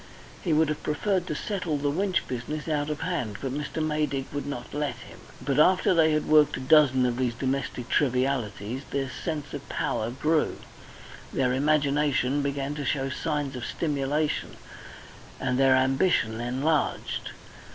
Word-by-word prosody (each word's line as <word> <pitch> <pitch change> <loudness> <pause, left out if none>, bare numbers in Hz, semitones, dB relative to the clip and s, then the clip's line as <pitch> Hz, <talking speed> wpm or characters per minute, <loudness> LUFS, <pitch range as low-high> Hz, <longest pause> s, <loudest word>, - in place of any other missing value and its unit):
He 175 - 0
would 155 +1 +4
have 155 0 -2
preferred 180 +4 0
to 155 - -2
settle 180 -5 -2
the 145 0 0
Winch 185 +4 0
business 140 +6 -4
out 150 -1 0
of 150 - -3
hand, 125 - -2
but 135 -2 -3
Mr. 150 +2 -2
Maydig 150 -3 -1
would 145 0 -3
not 140 -4 -6
let 145 -1 -1
him. - - -13 0.2
But 135 +2 0
after 185 +3 +5
they 160 -2 +4
had 155 0 +1
worked 150 -1 +4
a - - -5
dozen 130 -1 +5
of 120 -1 0
these 125 -2 0
domestic 130 -1 -2
trivialities, 125 -4 0
their 135 -1 -2
sense 150 +1 -4
of 145 -1 -7
power 110 - -1
grew, 150 +5 0 0.7
their 125 -2 +1
imagination 145 -1 +2
began 140 0 -2
to 150 -1 -4
show 135 -1 0
signs 145 -1 -2
of 125 - -5
stimulation, 150 +1 -1 0.8
and 125 0 0
their 135 -1 +6
ambition 130 -3 +2
enlarged. 135 +6 -1
145 Hz, 160 wpm, -27 LUFS, 130-155 Hz, 0.8 s, their